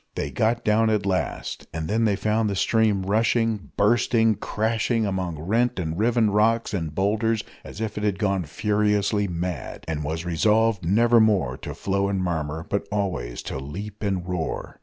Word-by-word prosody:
They 70 - -3
got 110 - 0
down 110 +1 +3
at 105 -2 +1
last, 95 -2 -2
and 80 0 -4
then 115 +5 +1
they 105 -2 +2
found 110 +1 0
the 100 - -2
stream 105 -1 +2
rushing, 110 +1 +1
bursting, 115 0 +3
crashing 110 +2 0
among 95 -4 -2
rent 115 +10 0
and 80 -3 -2
riven 110 +1 +2
rocks 115 +3 +2
and 80 -6 -3
boulders 110 +3 +1 0.2
as - - -10
if 110 -1 -3
it - - -5
had 105 -2 +1
gone 95 -3 0
furiously 105 +3 +1
mad, 85 -5 -4
and 75 -2 -2
was 80 +3 -3
resolved 105 +4 +2
never 115 +7 +4
more 100 - +2
to - - -7
flow 100 0 0
and 95 -2 -1
murmur, 80 -2 -2
but 100 - -2
always 90 -13 -2
to - - -4
leap 100 +10 -7
and 95 -4 -2
roar. 90 -3 -4
100 Hz, 175 wpm, -24 LUFS, 90-110 Hz, 0.2 s, never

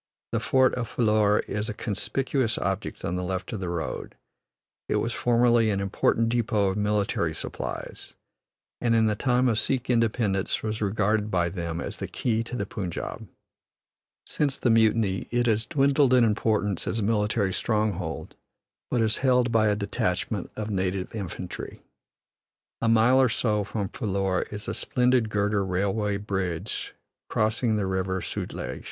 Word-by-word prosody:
The - - +1
fort 130 -1 +3
of 120 -3 -3
Phillour 105 -2 +2
is 105 +1 -2
a 105 - -4
conspicuous 120 +3 -1
object - - -3
on 90 - -1
the 90 - -2
left 95 +4 -3
of 110 - -3
the 90 -2 -3
road; 85 -2 -4 0.7
it - - +1
was 115 - 0
formerly 120 -1 +3
an 100 -2 0
important 100 +3 +1
depot 110 -4 +1
of 95 - -2
military 105 -6 0
supplies, - - -6 0.7
and 115 -1 +2
in 110 -1 +4
the 110 - +2
time 125 +2 +2
of 110 -3 +2
Sikh 130 -1 0
independence 110 -4 +1
was 110 0 -3
regarded 105 +1 +1
by 90 -3 +1
them 85 -2 -4
as - - -4
the - - -4
key 115 -2 -1
to 125 - -5
the 100 - -2
Punjab. 95 -4 -5 1.0
Since 140 -3 0
the 120 - +2
mutiny 110 -3 +2
it 120 0 +1
has 110 -1 +1
dwindled 140 -2 +3
in 125 - +5
importance 105 -3 +1
as - - -1
a 110 - 0
military 105 -2 +1
stronghold, 100 -8 -1 0.6
but 120 - +1
is 110 -1 +2
held 125 -2 +3
by 110 -1 +4
a 105 - +2
detachment 100 -1 -2
of 110 0 -4
native 95 -1 -2
infantry. 95 -3 -6 1.0
A 115 - +1
mile 115 +4 +5
or 130 - +4
so 105 -3 +1
from 100 0 -3
Phillour 95 -5 -1
is 105 0 -5
a - - -2
splendid 125 -2 +2
girder 105 -1 +1
railway 100 +2 0
bridge 95 -5 -3 0.3
crossing 110 +1 +1
the 105 -2 0
River 95 0 -1
Sutlej. - - -4
105 Hz, 160 wpm, -26 LUFS, 95-115 Hz, 1.0 s, in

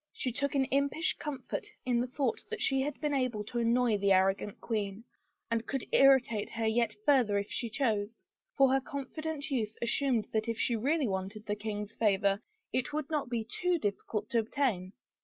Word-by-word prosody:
She 255 - -2
took 280 +4 -1
an 270 -1 +3
impish 280 +4 +2
comfort 295 -3 -4 0.2
in 245 -2 +2
the 250 - -1
thought 255 -2 -1
that - - -4
she 270 -1 +2
had 295 +2 -3
been 295 -1 -1
able 250 -6 0
to 240 +3 -3
annoy 235 -2 +3
the 200 0 +2
arrogant 195 +2 +2
queen 210 -2 -3 0.5
and 230 0 0
could 270 -2 -2
irritate 260 -6 +5
her 225 -1 -2
yet 220 -1 +1
further 250 -8 +4
if 200 +1 -3
she 235 0 -2
chose 220 -3 -1
— - - -38
for 270 -1 +6
her 270 - +3
confident 295 +2 -5
youth 220 -5 -1
assumed 235 -1 +1
that 220 +1 0
if 230 - -1
she 235 - +1
really 280 +5 +1
wanted 195 +2 -4
the 205 - -1
king's 210 0 -4
favor 200 -2 +2 0.3
it 255 +2 0
would 305 +1 -3
not 295 -5 -1
be 235 -2 -1
too 355 +10 0
difficult 210 -3 -2
to 235 - +3
obtain! 220 -6 -1
235 Hz, 195 wpm, -31 LUFS, 210-270 Hz, 0.5 s, for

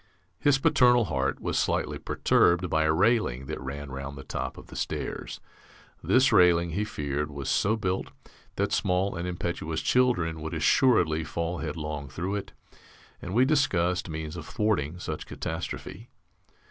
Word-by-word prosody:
His 145 -2 +4
paternal 125 -3 +4
heart 70 -6 -1
was - - -1
slightly - - -1
perturbed 90 -1 +2
by 80 0 +2
a 80 - +3
railing 80 - +2
that - - -5
ran 70 +1 -6
round 70 +1 -6
the 70 - -8
top - - -4
of - - -11
the - - -13
stairs. - - -4 0.6
This 130 +1 +4
railing, 85 -1 +5
he 100 +6 -1
feared, 75 -7 -3
was 70 -2 -4
so 105 +2 +2
built 95 -3 -2 0.5
that - - 0
small 90 +2 +1
and 85 +1 -3
impetuous 85 -2 -3
children 90 -10 +2
would 80 0 -4
assuredly 85 -12 +3
fall 85 +2 -3
headlong 75 -2 -4
through 90 +8 -3
it, 100 -1 -4 0.7
and 90 - -5
we 125 +2 +5
discussed 90 - +1
means 80 0 -5
of 80 -3 -7
thwarting 90 -8 0
such - - -5
catastrophe. 115 +6 -6
85 Hz, 155 wpm, -27 LUFS, 75-105 Hz, 0.7 s, railing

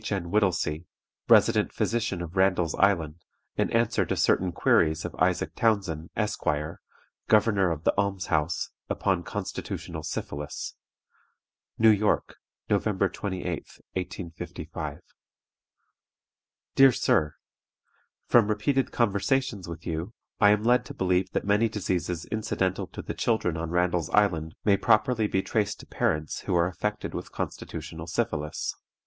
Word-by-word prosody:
N. 95 -4 -2
WHITTELSEY, 90 -5 +1 0.4
Resident - - +5
Physician 110 -6 -1
of 85 +2 -8
Randall's 95 -4 +2
Island, 85 -6 +2 0.4
in - - +1
answer 115 0 +2
to - - -2
certain 95 -1 +2
queries 80 -1 +2
of - - -5
ISAAC 90 0 +1
TOWNSEND, 95 -8 0
Esq., 105 -2 -1 0.8
Governor 105 -3 +4
of 80 -2 -3
the - - +3
Alms 100 -2 0
house, 80 +1 0 0.2
upon 95 -3 0
Constitutional - - -5
Syphilis: 75 0 -5 1.0
"New 110 0 +6
York, 105 0 +1 0.3
November 100 -1 +1
28, 95 -1 -5 0.5
1855. 90 -2 -6 1.7
"DEAR 135 -1 +7
SIR, 75 -9 +1 0.9
From 115 -4 +5
repeated 130 +6 +1
conversations 115 -1 0
with 85 -1 -8
you, 85 +6 -4 0.2
I 105 - +6
am 105 0 +3
led 120 +2 +4
to - - -9
believe 90 0 +1
that - - -1
many 105 +3 +3
diseases 90 -5 -2
incidental 95 -3 -1
to - - -8
the - - -4
children 110 -8 0
on 80 0 -3
Randall's 90 -1 +1
Island 85 -6 +2
may 100 -2 +5
properly 110 +1 +3
be 95 -2 0
traced 105 -2 -1
to - - -13
parents 75 -1 -1
who 90 - -2
are 85 0 +4
affected 105 +4 -3
with - - -6
constitutional 80 +1 -6
syphilis. 75 -2 -2
95 Hz, 130 wpm, -27 LUFS, 85-105 Hz, 1.7 s, DEAR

